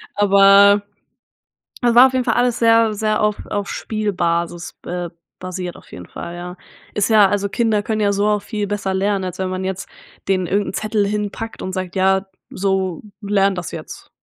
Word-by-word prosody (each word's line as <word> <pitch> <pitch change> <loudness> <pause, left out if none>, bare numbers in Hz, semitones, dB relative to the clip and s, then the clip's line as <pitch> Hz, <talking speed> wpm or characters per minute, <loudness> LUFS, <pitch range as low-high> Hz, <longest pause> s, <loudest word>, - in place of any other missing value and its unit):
aber 200 0 +6 1.0
es 240 -1 +3
war 255 +2 +9
auf 260 - -6
jeden 255 -1 0
Fall 225 - +1
alles 245 -1 +1
sehr 230 -1 +4
sehr 215 +1 0
auf 210 -1 +1
auf 205 -1 -3
Spielbasis 175 -5 -2
be 175 -1 -5 0.3
basiert 185 -1 -5
auf - - -18
jeden 90 -1 -9
Fall, 170 0 -8
ja. 180 +1 -8 0.4
Ist 210 +2 0
ja 210 -3 +6
also 200 0 -1
Kinder 225 -2 +1
können 215 0 -2
ja 205 -1 +2
so 200 +1 +1
auch 210 -1 +1
viel 210 -3 -3
besser 200 -2 -2
lernen, 195 0 0
als 180 0 -6
wenn 185 -1 -1
man 185 0 -3
jetzt 190 0 -4 0.4
den 185 -2 +1
irgend 200 +3 0
'n - - -7
Zettel 215 -1 0
hinpackt 210 +2 -4
und 185 - -5
sagt: 185 -1 -4
„Ja, 190 +1 +2 0.2
so 190 -2 -1 0.2
lern 200 -1 +1
das 180 -3 -5
jetzt.“ - - -9
200 Hz, 190 wpm, -19 LUFS, 185-210 Hz, 1.0 s, war